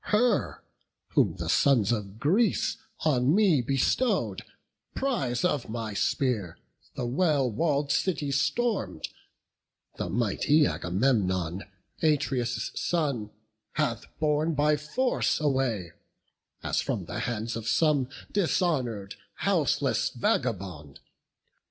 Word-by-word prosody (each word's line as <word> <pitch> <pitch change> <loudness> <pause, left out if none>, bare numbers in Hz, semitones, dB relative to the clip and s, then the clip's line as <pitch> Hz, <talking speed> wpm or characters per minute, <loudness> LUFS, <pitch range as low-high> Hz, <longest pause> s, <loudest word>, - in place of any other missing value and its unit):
Her, 220 0 +1 0.5
whom 80 - +2
the 85 -3 -5
sons 120 - +3
of 105 -2 -3
Greece 195 - +2 0.2
on 140 -1 +3
me 195 -10 +4
bestow'd, 135 - +1 0.5
Prize 140 - 0
of 150 -10 0
my 110 -2 -4
spear, 105 -4 0 0.4
the 130 -3 -3
well 140 -1 +1
wall'd 145 +3 0
city 145 -4 0
storm'd, 140 - 0 0.9
The - - -3
mighty 120 - +2
Agamemnon, 95 -5 0 0.4
Atreus' 130 -7 0
son, 140 -11 -1 0.4
Hath 125 -7 -1
borne 155 +1 +1
by 150 +1 +3
force 200 - 0
away, 130 - 0 0.7
as - - 0
from - - -3
the - - -5
hands 115 -1 -2
Of 115 -1 -5
some 145 -4 +2 0.2
dishonour'd, 135 - 0 0.2
houseless - - +1
vagabond. 90 -9 -2
135 Hz, 100 wpm, -28 LUFS, 110-155 Hz, 0.9 s, me